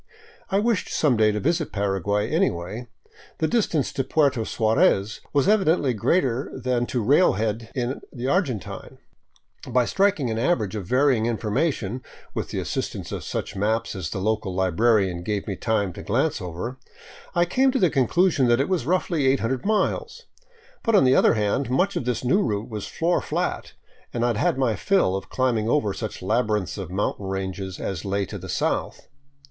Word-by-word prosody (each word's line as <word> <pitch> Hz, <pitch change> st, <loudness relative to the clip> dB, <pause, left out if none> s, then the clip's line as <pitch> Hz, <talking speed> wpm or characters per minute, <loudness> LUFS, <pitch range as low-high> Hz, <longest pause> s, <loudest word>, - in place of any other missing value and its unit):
I 195 Hz, -, +1 dB
wished 215 Hz, -1 st, +1 dB
some 145 Hz, -5 st, +2 dB
day 110 Hz, -1 st, +4 dB
to 105 Hz, -, -2 dB
visit 165 Hz, +5 st, 0 dB
Paraguay, 100 Hz, +1 st, 0 dB
anyway; 120 Hz, -, -1 dB, 0.5 s
the 160 Hz, -, +1 dB
distance 185 Hz, -, 0 dB
to 135 Hz, -, -1 dB
Puerto 140 Hz, -3 st, +2 dB
Suarez 110 Hz, -, +2 dB
was 140 Hz, -2 st, +2 dB
evidently 180 Hz, -10 st, +3 dB
greater 130 Hz, -, 0 dB
than 125 Hz, -1 st, -1 dB
to 120 Hz, -3 st, -1 dB
railhead 115 Hz, -, +2 dB
in 125 Hz, +1 st, -2 dB
the 125 Hz, -1 st, -6 dB
Argentine 135 Hz, -, -2 dB, 0.4 s
— -, -, -20 dB
by 125 Hz, -1 st, +4 dB
striking 190 Hz, -, +1 dB
an 110 Hz, -, -2 dB
average 115 Hz, -, 0 dB
of 100 Hz, -4 st, -5 dB
varying 125 Hz, -2 st, +3 dB
information, 120 Hz, -, -1 dB, 0.3 s
with -, -, -3 dB
the -, -, -4 dB
assistance -, -, -3 dB
of -, -, -4 dB
such -, -, -4 dB
maps 110 Hz, +3 st, 0 dB
as 90 Hz, -5 st, -4 dB
the -, -, -4 dB
local 105 Hz, -1 st, -1 dB
librarian 95 Hz, 0 st, +2 dB
gave 100 Hz, +2 st, -2 dB
me 100 Hz, -, -3 dB
time 100 Hz, -3 st, -1 dB
to -, -, -8 dB
glance 130 Hz, +3 st, 0 dB
over, 90 Hz, +9 st, -5 dB, 0.6 s
I 175 Hz, 0 st, +4 dB
came 260 Hz, +9 st, +2 dB
to 265 Hz, -, 0 dB
the 180 Hz, -, +3 dB
con 130 Hz, -3 st, +2 dB
clusion 170 Hz, -6 st, +3 dB
that 120 Hz, +1 st, +3 dB
it 140 Hz, -, 0 dB
was 175 Hz, -9 st, 0 dB
roughly 170 Hz, -5 st, +1 dB
800 130 Hz, -, 0 dB
miles 220 Hz, -, 0 dB, 0.3 s
— 470 Hz, +2 st, -30 dB
but 230 Hz, -2 st, +2 dB
on 200 Hz, -, +6 dB
the 130 Hz, 0 st, +5 dB
other -, -, +5 dB
hand 110 Hz, +5 st, 0 dB
much 180 Hz, +10 st, +1 dB
of -, -, -2 dB
this 125 Hz, -1 st, -1 dB
new 135 Hz, +12 st, +3 dB
route 105 Hz, -, -2 dB
was 105 Hz, -3 st, -5 dB
floor 170 Hz, +2 st, 0 dB
flat, -, -, -3 dB, 0.4 s
and 120 Hz, -, -2 dB
I -, -, +2 dB
had 115 Hz, -, -1 dB
had 125 Hz, -, +1 dB
my 130 Hz, -5 st, +1 dB
fill 190 Hz, -, +2 dB
of 95 Hz, -, -5 dB
climbing 120 Hz, -4 st, 0 dB
over 110 Hz, -8 st, +1 dB
such 110 Hz, -3 st, -6 dB
labyrinths 105 Hz, -2 st, 0 dB
of 95 Hz, -4 st, -5 dB
mountain 95 Hz, +1 st, -2 dB
ranges 95 Hz, -1 st, -4 dB
as 95 Hz, -4 st, -4 dB
lay 100 Hz, 0 st, -1 dB
to 100 Hz, +1 st, -7 dB
the 95 Hz, +1 st, -9 dB
south. -, -, -2 dB
120 Hz, 185 wpm, -24 LUFS, 105-150 Hz, 0.6 s, on